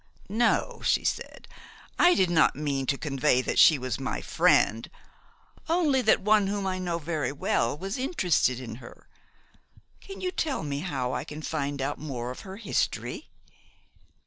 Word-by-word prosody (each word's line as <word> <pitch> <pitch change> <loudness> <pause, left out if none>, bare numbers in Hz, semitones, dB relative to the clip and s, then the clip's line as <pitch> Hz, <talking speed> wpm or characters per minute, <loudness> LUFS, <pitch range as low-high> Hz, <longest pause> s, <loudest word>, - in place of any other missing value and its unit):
"No," 230 +4 +1
she - - +2
said, - - -3 0.5
"I 355 0 +6
did 185 -2 +2
not 160 -2 +4
mean 140 -2 -2
to 140 - +1
convey 135 -3 +1
that - - -1
she 155 - +7
was 130 -2 -4
my 135 - -3
friend; 115 +2 +2 0.8
only 315 -6 +2
that 220 - +3
one 210 0 +3
whom 200 0 -2
I 185 -1 -2
know 175 -2 -2
well 145 -5 -1
was 195 - -5
interested 180 - +1
in 115 -3 -7
her. 120 - -14 0.9
Can 390 - -10
you 365 - -2
tell 305 - -2
me 140 -1 -3
how 135 -7 -3
I - - -2
can 150 +1 -9
find 140 -3 -3
out 145 +2 -3
more 125 -5 -5
of 130 - -9
her 190 0 -9
history?" 220 - -2
155 Hz, 160 wpm, -27 LUFS, 135-200 Hz, 0.9 s, she